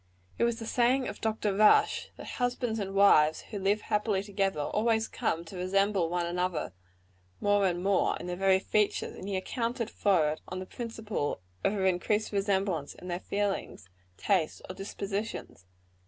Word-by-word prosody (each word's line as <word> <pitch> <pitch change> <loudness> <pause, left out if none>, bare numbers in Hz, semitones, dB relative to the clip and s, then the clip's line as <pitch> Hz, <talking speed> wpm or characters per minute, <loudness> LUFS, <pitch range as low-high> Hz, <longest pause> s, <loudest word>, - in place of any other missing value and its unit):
It - - +4
was 235 -1 0
the 225 - -6
saying 250 +3 +2
of - - -7
Dr. 220 -2 0
Rush, 210 +1 +4
that - - -9
husbands 245 -2 0
and 195 -1 -4
wives 160 -6 +5
who 205 - -3
live 200 +2 +1
happily 210 -2 0
together, 195 -5 -1
always 220 +7 +1
come 165 +1 -2
to 165 - -10
resemble 190 -1 +1
one 175 0 0
another 180 - -2 0.7
more 205 -1 +3
and 175 0 -2
more, 195 -1 +2
in - - -8
their 180 0 -3
very 190 +1 +4
features; 210 +2 0
and 190 - -8
he 200 - -2
accounted 230 +3 -2
for 175 -7 +3
it 155 - -6
on 185 - -5
the 185 - -5
principle 225 -8 -4 0.2
of - - +2
an 190 - 0
increased 190 +4 +1
resemblance 195 -6 0
in 180 - -10
their 175 0 -2
feelings, 200 - -3 0.3
tastes 180 -6 +1
or - - -6
dispositions. 200 - -5
195 Hz, 170 wpm, -29 LUFS, 180-215 Hz, 0.7 s, wives